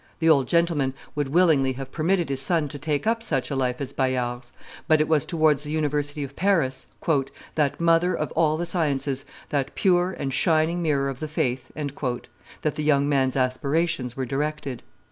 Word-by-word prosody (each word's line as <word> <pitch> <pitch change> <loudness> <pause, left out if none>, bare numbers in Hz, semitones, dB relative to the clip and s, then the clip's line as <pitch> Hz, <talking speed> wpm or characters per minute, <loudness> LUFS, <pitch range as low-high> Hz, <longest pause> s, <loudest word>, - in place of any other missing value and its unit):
The 165 - +2
old 140 -5 +4
gentleman 165 -6 +1 0.2
would 145 -2 -1
willingly 145 -4 +3
have 135 +1 -7
permitted 170 0 0
his 135 -1 -1
son 160 +1 +2
to 145 - -6
take 145 +2 -1
up 230 +1 +1
such 140 - -1
a - - -1
life 125 -2 0
as 140 -3 -4
Bayard's; 125 -2 -1 0.4
but 155 -1 +5
it 155 - +2
was 155 -3 +2
towards 155 -4 +2
the 150 - -7
University 150 -1 -1
of 140 0 -8
Paris, 165 -9 +1 0.7
"that 145 -3 0
mother 170 +2 +3
of - - -3
all 155 -1 +2
the 175 - -2
sciences, 140 -6 0 0.2
that 140 -2 -2
pure 180 -1 +2
and 135 -1 -3
shining 165 +2 +2
mirror 145 -4 +1
of 135 -2 -4
the 155 - -3
faith," 130 -4 -2
that 145 +1 -4
the 150 - -4
young 140 -2 +3
man's 135 -3 +1
aspirations 135 0 0
were 130 - -1
directed. 140 0 -3
145 Hz, 185 wpm, -25 LUFS, 135-160 Hz, 0.7 s, but